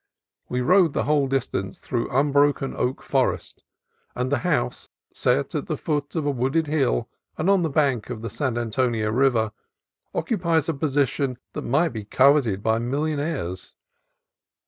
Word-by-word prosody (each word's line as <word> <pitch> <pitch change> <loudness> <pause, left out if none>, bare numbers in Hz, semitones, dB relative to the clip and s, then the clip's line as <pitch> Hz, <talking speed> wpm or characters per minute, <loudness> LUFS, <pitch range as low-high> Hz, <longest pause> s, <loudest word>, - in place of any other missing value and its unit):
We 125 - -1
rode 175 +2 +4
the - - 0
whole 145 -2 +2
distance 130 -8 -2
through 120 -2 -3
unbroken 140 0 +2
oak 130 +2 -2
forest, - - -1 0.5
and 125 +2 -2
the 145 - +2
house, 60 - -1 0.2
set - - +1
at - - -3
the - - -2
foot 145 -1 -2
of 160 -3 -1
a 145 - +2
wooded 135 +5 0
hill 145 - 0 0.3
and 160 - -1
on 195 -2 +4
the 165 - 0
bank 135 -6 +1
of 115 -3 -6
the 115 - -3
San 130 -2 -2
Antonio 115 -2 0
River, 120 -3 +2 0.6
occupies 170 - +1
a 165 - +1
position 140 -2 0 0.2
that - - -4
might 155 +8 +2
be 110 -3 -6
coveted 125 -3 +3
by 110 0 +2
millionaires. 140 - -2
135 Hz, 155 wpm, -24 LUFS, 120-150 Hz, 0.6 s, rode